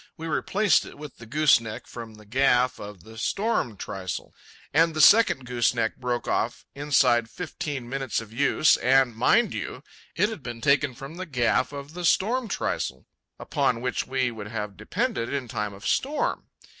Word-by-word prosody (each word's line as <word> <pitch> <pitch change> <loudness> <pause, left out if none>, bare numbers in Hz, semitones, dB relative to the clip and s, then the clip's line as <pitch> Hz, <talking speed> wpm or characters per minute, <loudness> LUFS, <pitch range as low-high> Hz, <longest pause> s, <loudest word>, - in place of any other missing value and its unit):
We 160 - -7
replaced 200 +6 +2
it - - -12
with 150 -2 -10
the 115 - -12
gooseneck 125 -4 +2
from 115 -2 -9
the 105 0 -16
gaff 125 +1 +2
of 100 -4 -9
the 110 +2 -11
storm 195 - -1
trysail, 95 -2 -6 0.4
and 165 +1 +3
the - - -2
second 180 - +6
gooseneck 120 -2 0
broke 125 -1 -2
short - - 0
off - - -2
inside 135 -5 +2
fifteen 150 -7 -5
minutes 135 -1 -2
of 110 -1 -10
use, 145 +4 +3
and, 130 -2 +3
mind 195 - +3
you, - - -5 0.3
it 210 - +2
had 220 -8 -7
been 120 -2 -7
taken 140 +1 +2
from 135 +7 -9
the 185 0 -5
gaff 125 -1 +1
of 140 +1 -8
the 180 +1 -6
storm 230 +8 +2
trysail, 65 - -3 0.3
upon 120 - 0
which 125 +1 -2
we 130 -2 0
would 105 -3 -8
have 105 -2 -5
depended 185 - -2
in 140 -3 -3
time 105 -2 -3
of 100 - -12
storm. 290 +2 -1
130 Hz, 175 wpm, -26 LUFS, 115-155 Hz, 0.4 s, second